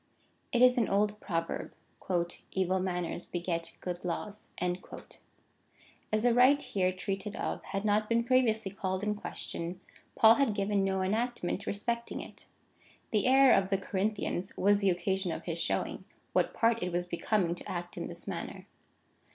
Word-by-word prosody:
It 245 -1 +4
is 250 0 +6
an 225 - +1
old 210 +1 +1
proverb: 165 -5 -3 0.4
" 175 -1 -2
Evil 190 0 +1
manners 180 -2 -2
beget 170 -1 -3
good 180 -1 -4
laws."^ 200 +4 -4 1.6
As 215 +1 +1
the 245 -1 +4
rite 260 +4 +6
here 185 -2 +1
treated 195 +2 -4
of - - -3
had 195 +1 -3
not 210 0 +2
been 230 0 +3
previously 225 -5 +2
called 190 0 -3
in 210 0 +1
question, 180 -3 -5 0.4
Paul 220 0 +8
had 235 -4 +2
given 200 -1 +1
no 190 -1 0
enactment 215 -1 -1
respecting 235 +3 -2
it.^ - - -10 0.7
The 215 +2 +2
error 265 0 +7
of 190 -1 +3
the 195 - +2
Corinthians 195 -1 -2
was 205 +1 +4
the 200 -1 +3
occasion 185 +1 0
of - - -5
his 170 -1 -3
showing, - - -1 0.3
what - - +1
part 230 0 +2
it 180 - -1
was 175 +1 -1
becoming 175 0 0
to 175 - -8
act 175 0 -5
in - - -4
this - - -9
matter. - - -5
195 Hz, 160 wpm, -31 LUFS, 180-220 Hz, 1.6 s, Paul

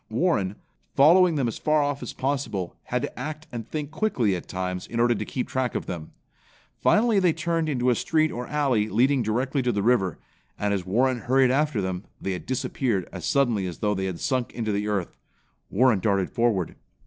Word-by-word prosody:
Warren, 110 - +1 0.4
following 170 +4 +6
them 135 -4 +1
as 115 - -4
far 155 -1 +2
off 145 -1 -2
as - - -5
possible, 130 -10 -2
had 125 +1 -1
to 145 - -5
act 155 +3 -5
and 115 -2 -6
think 150 -2 -4
quickly 145 - +1
at 90 - -7
times 90 0 -4
in 115 - -4
order 120 0 +4
to 105 -1 -3
keep 125 - -3
track 130 -1 -1
of - - -2
them. 80 -3 -6 0.7
Finally 220 -1 +4
they 180 -3 +3
turned 165 0 -1
into 125 -3 +2
a - - +4
street 155 +6 +1
or 120 +1 -5
alley 130 -8 +1
leading 130 +5 +3
directly 125 +5 0
to 125 -1 +1
the 100 -3 -1
river, 100 -8 +2 0.4
and 105 0 0
as 95 -2 -2
Warren 125 +5 +2
hurried 130 +1 +3
after 140 -5 +1
them 95 0 -3 0.2
they 95 -2 -3
disappeared 125 -5 -1
as - - -6
suddenly 120 -9 +2
as 90 - -6
though 105 -1 0
they 95 -1 -2
had 90 -3 -4
sunk 130 -2 -1
into 110 -3 -2
the 105 +1 -1
earth. 100 -4 -2 0.5
Warren 120 -1 +3
darted 100 -1 +1
forward. 115 -8 +1
120 Hz, 200 wpm, -25 LUFS, 100-145 Hz, 0.7 s, following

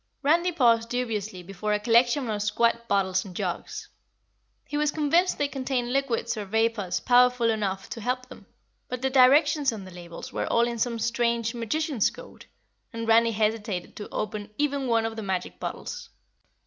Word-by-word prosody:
Randy 340 +5 +3
paused 230 -7 +3
dubiously 215 -6 -3
before 195 +3 -3
a 210 - +1
collection 240 +4 +3
of 210 -2 -2
squat 235 +3 +1
bottles 190 -2 +1
and 185 -3 -11
jugs. - - -4 0.8
He - - -6
was 300 0 +2
convinced 315 +5 +2
they 290 - +1
contained 260 -3 -2
liquids 245 -4 0
or 210 -2 -5
vapors 220 -2 0
powerful 245 -1 +4
enough 195 -3 -2
to 230 - -5
help 250 +3 -2
them, - - -14 0.4
but 250 0 -5
the 265 - +1
directions 280 +2 +5
on 210 -4 -7
the 185 - -11
labels 175 -1 -9
were - - -2
all 235 0 +3
in 235 -1 -4
some 235 +1 0
strange 235 0 0
magician's 245 +1 0
code - - -13 0.4
and 230 0 -5
Randy 230 +1 +5
hesitated 210 -4 -1
to 205 - -7
open 210 0 -4
even 285 -2 0
one 230 -1 +2
of 225 0 -3
the 220 - -5
magic 190 -3 -3
bottles. - - -6
230 Hz, 175 wpm, -26 LUFS, 210-255 Hz, 0.8 s, directions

